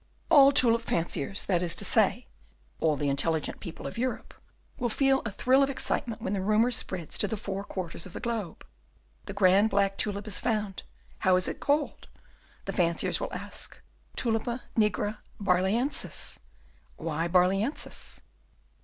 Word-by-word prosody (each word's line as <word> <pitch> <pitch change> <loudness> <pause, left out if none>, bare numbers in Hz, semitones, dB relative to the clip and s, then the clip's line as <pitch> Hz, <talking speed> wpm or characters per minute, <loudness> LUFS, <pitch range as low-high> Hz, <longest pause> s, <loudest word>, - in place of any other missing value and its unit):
All 280 -3 +9
the 280 - +4
tulip 235 -3 +6
fanciers 170 -2 -2
that 180 -3 +1
is 175 -2 0
to - - -1
say, - - +3 0.5
all 155 -2 +2
the 145 0 -2
intelligent 155 +3 0
people 170 - -8
of - - -5
Europe 255 +1 -3 0.5
will 240 -1 0
feel 270 +3 +2
a - - -4
thrill 255 +6 +3
of 275 - +3
excitement 235 -4 -2
when 205 - -1
the 195 - -1
rumour 215 +5 +3
spreads 180 -8 -1
to 205 - +3
the 220 - -3
four 195 -1 -4
quarters 180 -3 -5
of 180 - -14
the - - -5
globe: 225 -8 -4 0.6
The 200 - -5
grand 200 +2 +4
black 195 -1 +1
tulip 205 -1 -2
is 210 -4 -3
found! 210 -4 -1 0.4
'How 185 -1 +4
is 185 0 +1
it - - -4
called?' 290 +1 0 0.6
the - - -3
fanciers 170 -2 +1
will - - -4
ask. - - -6 0.4
'Tulipa 235 +1 -1
nigra 210 -1 +1 0.2
Barlœnsis!' 200 +7 0 0.6
'Why 165 +1 -2
Barlœnsis? 190 - 0
200 Hz, 160 wpm, -28 LUFS, 180-235 Hz, 0.6 s, All